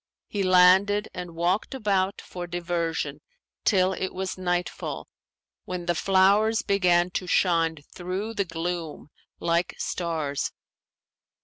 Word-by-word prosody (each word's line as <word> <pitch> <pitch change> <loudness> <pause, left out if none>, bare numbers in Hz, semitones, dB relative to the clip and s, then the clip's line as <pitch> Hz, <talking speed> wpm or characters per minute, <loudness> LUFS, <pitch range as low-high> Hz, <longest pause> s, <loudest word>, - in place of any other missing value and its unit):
He 205 - -3
landed 190 +3 +5
and 180 -2 -7
walked 180 +10 0
about 200 -5 0
for 175 -1 -7
diversion 170 -4 -2 0.4
till 190 -2 +3
it 190 0 -4
was 190 0 -3
nightfall, 180 -1 -3 0.6
when 180 -1 -5
the 175 - +2
flowers 200 +5 +3
began 180 -3 +3
to 180 - -3
shine 165 -3 +2 0.2
through 185 +5 -4
the 200 -3 0
gloom 165 -2 -4 0.3
like 170 +1 0
stars. 160 -5 -2
180 Hz, 115 wpm, -26 LUFS, 170-190 Hz, 0.6 s, landed